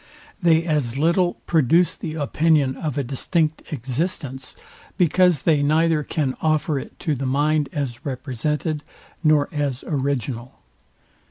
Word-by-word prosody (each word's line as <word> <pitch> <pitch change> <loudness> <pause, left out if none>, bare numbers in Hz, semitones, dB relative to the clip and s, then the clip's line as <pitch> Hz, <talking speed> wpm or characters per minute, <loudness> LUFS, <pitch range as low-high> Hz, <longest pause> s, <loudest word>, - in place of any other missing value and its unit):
They 165 -2 +4
as 145 -7 -1
little 170 +4 +2
produce 165 +2 +3
the 155 - -6
opinion 150 -2 +2
of 150 -4 -4
a 140 - +1
distinct 155 +6 -1
existence, 135 0 -3 0.4
because 180 -2 +3
they 155 -4 +3
neither 155 +2 +3
can 145 -3 -2
offer 155 -2 +1
it - - -10
to 155 - 0
the 135 -1 -3
mind 145 +2 +1
as 130 -5 -4
represented, 145 +3 -2 0.4
nor 155 -2 +4
as 145 -3 -2
original. 130 -4 -2
150 Hz, 125 wpm, -22 LUFS, 135-160 Hz, 0.4 s, They